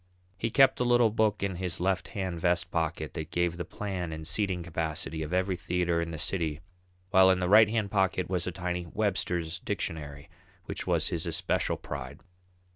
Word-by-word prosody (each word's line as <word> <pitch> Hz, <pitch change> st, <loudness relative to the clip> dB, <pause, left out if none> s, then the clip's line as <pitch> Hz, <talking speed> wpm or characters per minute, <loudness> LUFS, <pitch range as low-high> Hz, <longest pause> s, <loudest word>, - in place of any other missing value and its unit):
He 115 Hz, +5 st, -2 dB
kept 135 Hz, +3 st, +5 dB
a -, -, +2 dB
little 120 Hz, -2 st, +4 dB
book 110 Hz, -2 st, +1 dB
in 95 Hz, -3 st, -1 dB
his 90 Hz, -2 st, -3 dB
left 95 Hz, +1 st, 0 dB
hand 95 Hz, -3 st, -2 dB
vest 90 Hz, 0 st, +1 dB
pocket 80 Hz, -2 st, -2 dB
that 80 Hz, -1 st, -5 dB
gave 85 Hz, -1 st, 0 dB
the 85 Hz, -, -3 dB
plan 90 Hz, -2 st, -4 dB
and 80 Hz, 0 st, -6 dB
seating 95 Hz, -3 st, 0 dB
capacity 80 Hz, 0 st, -3 dB
of 80 Hz, +1 st, -4 dB
every 95 Hz, +1 st, +1 dB
theatre 90 Hz, -1 st, 0 dB
in 85 Hz, -, -3 dB
the 80 Hz, -, -5 dB
city, 80 Hz, -3 st, 0 dB, 0.5 s
while 95 Hz, -1 st, +7 dB
in 95 Hz, -1 st, +4 dB
the 90 Hz, -, 0 dB
right 105 Hz, +2 st, +7 dB
hand 110 Hz, -3 st, -1 dB
pocket 95 Hz, -2 st, +1 dB
was 90 Hz, -1 st, -1 dB
a -, -, -1 dB
tiny 90 Hz, 0 st, -3 dB
Webster's 90 Hz, -4 st, -1 dB
dictionary 75 Hz, -2 st, -4 dB, 0.4 s
which -, -, -5 dB
was -, -, +2 dB
his -, -, -2 dB
especial -, -, 0 dB
pride. 65 Hz, -3 st, -7 dB
90 Hz, 190 wpm, -29 LUFS, 85-95 Hz, 0.5 s, while